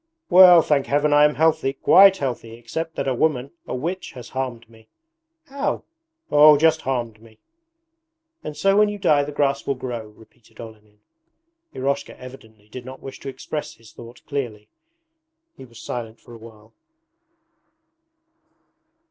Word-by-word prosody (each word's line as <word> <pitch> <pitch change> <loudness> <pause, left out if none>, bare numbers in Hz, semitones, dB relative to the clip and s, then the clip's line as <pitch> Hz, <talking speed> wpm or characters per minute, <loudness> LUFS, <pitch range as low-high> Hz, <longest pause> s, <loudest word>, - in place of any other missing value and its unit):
'Well, 180 -2 +8
thank 140 -3 0
Heaven 145 +3 +1
I 145 0 +6
am 150 - +1
healthy, 155 -3 +1
quite 195 +7 +5
healthy, 125 -5 -5
except 160 +7 -6
that - - -3
a 135 - +1
woman, 135 -1 -1 0.2
a - - -4
witch, 170 +8 -5
has 125 -2 -11
harmed 125 -3 -5
me....' 110 -1 -21 0.6
'How?' 280 -2 -3 0.5
'Oh, 150 0 +7
just 160 +1 +2
harmed 120 -5 -4
me.' 110 -1 -19 1.1
'And 150 -1 -7
so 195 +5 +2
when 210 0 +4
you 205 - -5
die 155 -7 +2
the 145 - -6
grass 140 -1 -1
will 140 - 0
grow?' 120 -3 -6
repeated 110 +2 -22
Olenin. 105 -2 -13 0.7
Eroshka 135 +2 -3
evidently 110 -5 -14
did 125 +3 -10
not 130 +1 -10
wish 135 - -10
to 140 - -7
express 150 +3 -7
his 115 -1 -19
thought 120 0 -14
clearly. 110 -7 -5 0.9
He 130 - -13
was 115 -2 -16
silent 115 -2 -7
for 120 - -16
a 115 - -12
while. 110 -1 -16
130 Hz, 155 wpm, -22 LUFS, 115-150 Hz, 1.1 s, Well